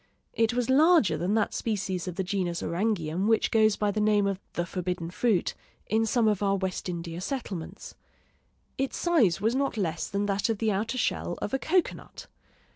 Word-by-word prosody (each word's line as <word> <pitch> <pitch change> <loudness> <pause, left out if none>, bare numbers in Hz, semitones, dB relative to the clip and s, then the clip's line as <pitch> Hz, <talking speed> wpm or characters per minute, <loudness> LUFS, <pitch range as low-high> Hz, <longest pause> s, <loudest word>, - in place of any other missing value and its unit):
It 225 +1 +1
was 245 -1 0
larger 290 - +5
than 175 +7 0
that 215 - +1
species 190 -5 -2
of 180 - -4
the 190 - -1
genus 180 -3 -2
Orangeum 180 -1 -1
which 225 -1 +2
goes 215 -2 +4
by 210 -1 0
the 210 - -1
name 210 -1 +3
of 195 -1 -1
"the 175 - -1
forbidden 180 -2 -4
fruit" 205 0 +1 0.3
in 225 +1 +1
some 225 0 +2
of 210 -2 +1
our 195 -1 +2
West 190 -1 -3
India 170 0 -5
settlements. 195 - -5 0.9
Its 270 0 -1
size 275 - +3
was 220 +3 +1
not 275 -2 -1
less 170 -5 -1
than 200 +1 -1
that 205 +3 0
of 225 - 0
the 220 0 +1
outer 220 +6 -2
shell - - -1
of - - -4
a 270 - +1
cocoanut. 355 +5 -1
205 Hz, 190 wpm, -27 LUFS, 180-225 Hz, 0.9 s, larger